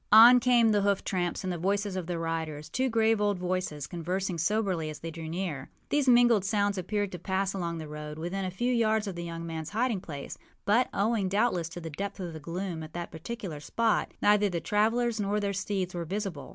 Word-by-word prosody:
On 235 +4 +10
came 240 -2 +4
the 205 -1 +3
hoof 200 -1 +1
tramps 175 -2 -1
and 185 -1 -1
the 175 - -4
voices 200 +2 0
of 180 -3 -3
the 175 -1 -2
riders, 160 -2 -3
two 260 +9 0
grave 225 -2 +3
old 205 -2 +2
voices, 180 -5 -2
conversing 180 +2 -3
soberly 185 -3 0
as 155 - -8
they 165 - -5
drew 160 0 -7
near. 165 -6 -3 0.2
These 285 -3 +2
mingled 240 -4 +6
sounds 200 0 +1
appeared 205 +2 -1
to 180 - -6
pass 190 +2 -1
along 170 -3 -3
the 160 -1 -6
road, 150 0 -7
within 175 +4 -3
a 185 - -1
few 240 +7 0
yards 220 -2 +2
of 195 - -4
the 170 - -5
young 165 -1 -5
manâs 160 -1 -5
hiding 225 -2 0
place; 145 -5 -7 0.3
but, 225 +5 +3
owing 205 -2 +1
doubtless 195 -5 +1
to 170 - -7
the 165 -1 -7
depth 200 +6 -5
of 175 -3 -5
the 160 - -7
gloom 170 +2 -4
at 155 0 -9
that 175 0 -5
particular 170 -1 -6
spot, 225 +9 0
neither 210 0 +5
the 175 -2 -2
travellers 225 +5 +1
nor 205 +1 0
their 200 -1 -1
steeds 190 -1 -2
were 175 -1 -3
visible. 185 -6 -4
190 Hz, 220 wpm, -29 LUFS, 165-210 Hz, 0.3 s, On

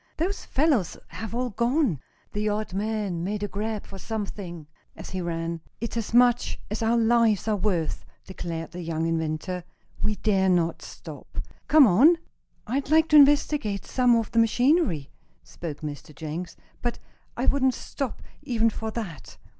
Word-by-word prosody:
Those 375 +5 -2
fellows 270 - +1
have 225 +1 -6
all 250 0 -1
gone!" 235 - +1 0.3
The 210 +1 0
odd 210 -2 -2
man 205 -4 -2
made 205 +2 -2
a - - 0
grab 210 +1 -3
for 195 - -10
something 195 -6 -5 0.3
as - - -9
he 185 0 -3
ran. 165 -1 -3 0.2
"It's 230 +1 -4
as 230 -2 -3
much 245 0 +4
as 215 - -2
our 230 +1 +3
lives 230 -2 +3
are 215 - +2
worth," 185 -5 -1 0.2
declared 165 -3 -5
the 180 - -6
young 165 -1 -2
inventor. 165 +2 -2 0.4
"We 215 - 0
dare 195 -1 +2
not 170 -2 +1
stop! - - -11 0.3
Come 305 -2 +8
on!" 260 - +6 0.5
"I'd 270 +5 -2
like 320 +1 +4
to 305 - +4
investigate 285 -7 +4
some 250 -2 +3
of 230 -1 0
the 230 - +3
machinery," 245 - +2 0.3
spoke 155 -4 -7
Mr. 150 0 -7
Jenks, 160 +4 -6 0.2
"but 240 -1 -2 0.4
I 245 - 0
wouldn't 265 -3 +3
stop, 275 -4 -5 0.2
even 230 -2 +1
for 220 +1 -4
that." 210 - -6
215 Hz, 160 wpm, -26 LUFS, 175-240 Hz, 0.5 s, Come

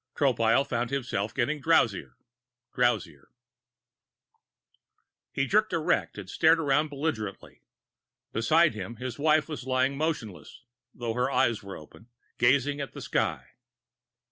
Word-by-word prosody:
Tropile 120 -2 +2
found 120 -1 -2
himself 120 -6 -2
getting 140 +5 -1
drowsier, 110 - +2 0.6
drowsier 95 - 0 2.0
He 135 - 0
jerked 215 +7 +2
erect 160 -8 0
and 100 -3 -7
stared 160 - +3
around 150 0 +2
belligerently. 135 -9 -5 0.7
Beside 155 +6 +3
him, 110 +2 -6
his 125 +1 -6
wife 155 0 +3
was 150 -5 -7
lying 130 +1 +1
motionless, 125 - -4 0.3
though 120 -2 -4
her 125 +2 0
eyes 120 -4 +1
were 100 0 -8
open, 80 +9 -15 0.3
gazing 140 +3 +2
at 140 - -6
the - - -8
sky. 65 0 -2
130 Hz, 120 wpm, -27 LUFS, 110-145 Hz, 2.0 s, stared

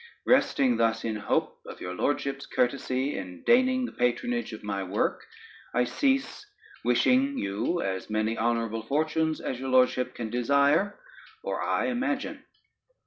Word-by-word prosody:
Resting 260 -4 +3
thus 115 0 +1
in 110 -1 -1
hope 105 - -1
of - - -9
your 90 - -5
Lordship's 140 +6 -1
courtesy 130 +2 0
in 90 -2 -9
deigning 255 +1 +4
the - - -6
patronage 240 - -1
of 110 - -9
my 100 -1 -2
work, 95 +2 -1 0.5
I 125 - +4
cease, 270 - 0 0.4
wishing 270 +2 +3
you 110 - -1
as 95 +1 -3
many 110 +1 0
honorable 115 -1 0
fortunes 155 +5 0
as 125 - -4
your 135 0 -4
Lordship 125 0 +3
can 115 -2 -5
desire 140 - +2 0.4
or - - -3
I - - 0
imagine. 265 +2 -2
130 Hz, 140 wpm, -27 LUFS, -, 0.5 s, deigning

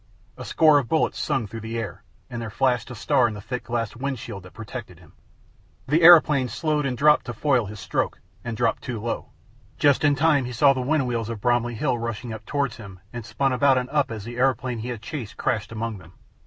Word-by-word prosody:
A - - -8
score 155 -2 +5
of 125 - -5
bullets 160 - +1
sung 135 -6 -1
through 115 +3 -8
the 110 +1 -5
air, 115 -3 -5 0.3
and 120 -1 -6
there 115 - -5
flashed 125 +2 0
a 125 - -7
star 120 +2 +2
in 110 - -5
the - - -7
thick 125 +5 -5
glass 115 -2 -2
wind 135 +2 -3
screen 100 -3 -8
that 90 0 -14
protected 110 -3 -8
him. 80 -3 -19 0.7
The 155 +5 +2
aeroplane 155 -6 +7
slowed 150 +4 -1
and 125 -2 -3
dropped 150 +2 +4
to 120 - -4
foil 125 -2 +1
his 105 0 -9
stroke, - - -2 0.2
and 115 -2 -5
dropped 115 -1 0
too 120 -3 -5
low. 115 +2 -4 0.5
Just 145 0 +3
in 145 -1 +4
time 145 -2 +3
he 125 - -6
saw 135 +4 +5
the 130 - -3
wind 140 +2 +1
wheels 115 -3 -2
of 115 -2 -5
Bromley 120 +1 +1
hill 125 0 0
rushing 115 0 -4
up 110 0 -8
towards 140 -5 -1
him, 100 -5 -11
and 120 -1 -5
spun 135 +4 -1
about 135 +1 +4
and 125 +1 -2
up 145 -2 +1
as 110 -3 -6
the 120 +2 -8
aeroplane 130 -2 0
he 115 - -5
had 120 -3 -6
chased 120 -4 -6
crashed 110 -3 -1
among 115 -2 -4
them. 85 0 -16
120 Hz, 235 wpm, -24 LUFS, 115-135 Hz, 0.7 s, aeroplane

